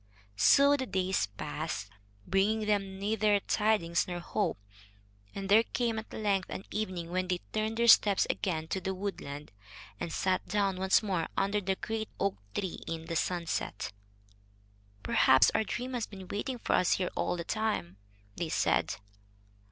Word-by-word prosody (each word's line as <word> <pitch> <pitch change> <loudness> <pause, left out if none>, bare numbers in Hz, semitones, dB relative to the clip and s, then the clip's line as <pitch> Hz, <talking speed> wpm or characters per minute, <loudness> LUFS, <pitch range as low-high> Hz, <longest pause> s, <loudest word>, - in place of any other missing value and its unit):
So 280 - +6
the 260 -2 -3
days 190 - 0
passed, 100 0 -5 0.3
bringing 210 +4 +1
them 195 -2 0
neither 210 +1 +2
tidings 210 -7 +1
nor 175 -1 -3
hope, 175 +1 -1 0.8
and 195 -1 -4
there 210 +3 +7
came 230 -1 -1
at 220 - -10
length 200 -3 0
an 190 - -6
evening 185 -5 -3
when 185 0 0
they 180 -1 +1 0.2
turned 220 +1 -1
their 235 0 +2
steps 205 -3 +6
again 160 -6 -2
to 190 - -2
the 190 +1 -2
woodland, 150 - -5 0.5
and 170 - -4
sat 185 +2 0
down 200 -2 +1
once 190 +3 +3
more 185 -6 -1
under 200 +2 +1
the 190 0 0
great 220 +2 -4
oak 200 0 0 0.2
tree 190 -3 -2
in 165 -1 -4
the 165 - -4
sunset. 170 - -2 1.1
"Perhaps 130 0 +5
our - - +2
dream 250 +4 -4
has 240 -3 -2
been 190 -3 -10
waiting 245 +5 -3
for - - -1
us 180 - +4
here 180 -2 -1
all - - 0
the 170 - -3
time," 190 - -2 0.4
they 170 -2 -3
said. - - +1
195 Hz, 160 wpm, -31 LUFS, 175-215 Hz, 1.1 s, there